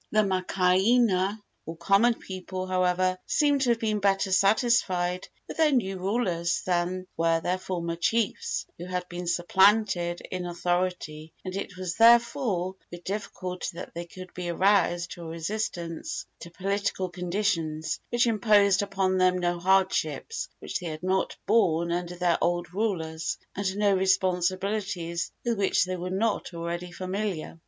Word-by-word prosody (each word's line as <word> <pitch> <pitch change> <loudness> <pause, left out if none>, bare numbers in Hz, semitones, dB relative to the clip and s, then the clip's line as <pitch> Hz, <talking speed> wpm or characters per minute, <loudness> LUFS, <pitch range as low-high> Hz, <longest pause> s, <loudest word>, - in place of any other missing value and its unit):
The 215 - +3
makaainana, 190 +2 +2 0.2
or 165 0 -6
common 195 +7 +3
people, 185 -1 -6
however, 185 0 +1
seem 290 -2 +3
to 260 -2 +1
have 235 -1 +2
been 215 -2 0
better 195 -1 +1
satisfied 190 -3 +2 0.2
with - - -8
their 315 -2 +4
new 195 -8 0
rulers 180 -4 0
than 180 +1 0
were 165 0 +2
their 180 +2 -1
former 170 -3 -3
chiefs 225 +5 0
who 175 - -6
had 180 0 -3
been 175 0 -6
supplanted 175 0 +3
in 180 -1 -3
authority, 175 -3 -2
and 185 0 -4
it 195 -1 -5
was 185 -2 -4
therefore 230 -5 +4
with 175 0 -10
difficulty 185 -2 -4
that 170 - -8
they 170 +1 -5
could 185 +1 -11
be 180 -1 -4
aroused 175 -1 +2
to 175 - -8
a 165 - -7
resistance 170 0 -4
to 170 - -9
political 195 +1 -2
conditions 175 -4 -2
which 240 0 +2
imposed 205 -3 +4
upon 190 -2 0
them 185 0 +4
no 175 -1 -1
hardships 190 - +1
which - - -4
they 180 - -6
had 155 +1 -6
not 190 +1 0
borne 170 -6 +2
under 175 0 -2
their 175 -1 +1
old 175 0 0
rulers, 160 -6 -2 0.2
and 195 0 -2
no 205 -1 +3
responsibilities 185 -1 0
with 235 -3 0
which 195 -2 +3
they 185 0 -3
were 180 0 -4
not 195 -2 -1
already 170 +1 -4
familiar. 185 -3 -4
185 Hz, 150 wpm, -27 LUFS, 175-200 Hz, 0.2 s, their